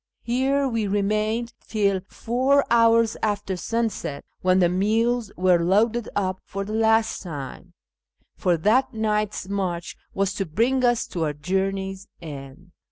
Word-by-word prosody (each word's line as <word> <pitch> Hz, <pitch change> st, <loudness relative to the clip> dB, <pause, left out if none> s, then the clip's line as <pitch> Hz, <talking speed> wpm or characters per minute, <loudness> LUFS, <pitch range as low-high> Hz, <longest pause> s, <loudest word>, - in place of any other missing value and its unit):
Here 270 Hz, +3 st, +1 dB
we 230 Hz, -4 st, -1 dB
remained 215 Hz, +4 st, 0 dB
till 200 Hz, -3 st, +1 dB
four 260 Hz, +4 st, +1 dB
hours 230 Hz, -1 st, +4 dB
after 205 Hz, -3 st, -1 dB
sunset, 225 Hz, -7 st, -3 dB, 0.2 s
when 185 Hz, 0 st, +3 dB
the 180 Hz, -2 st, +5 dB
mules 220 Hz, +5 st, +1 dB
were 180 Hz, -1 st, +3 dB
loaded 215 Hz, +6 st, +2 dB
up 185 Hz, -2 st, -1 dB
for 195 Hz, 0 st, -5 dB
the 215 Hz, -, -5 dB
last 225 Hz, 0 st, +2 dB
time, 170 Hz, +1 st, -8 dB, 0.6 s
for 180 Hz, -3 st, +1 dB
that 220 Hz, +10 st, +2 dB
night's 210 Hz, -3 st, -1 dB
march 185 Hz, -4 st, -3 dB, 0.2 s
was 195 Hz, 0 st, 0 dB
to 195 Hz, -2 st, -3 dB
bring 240 Hz, +11 st, +1 dB
us 240 Hz, -1 st, +2 dB
to 165 Hz, -3 st, -2 dB
our 150 Hz, -, -1 dB
journey's 190 Hz, +4 st, -2 dB
end. 145 Hz, +2 st, -10 dB
205 Hz, 140 wpm, -24 LUFS, 185-230 Hz, 0.6 s, the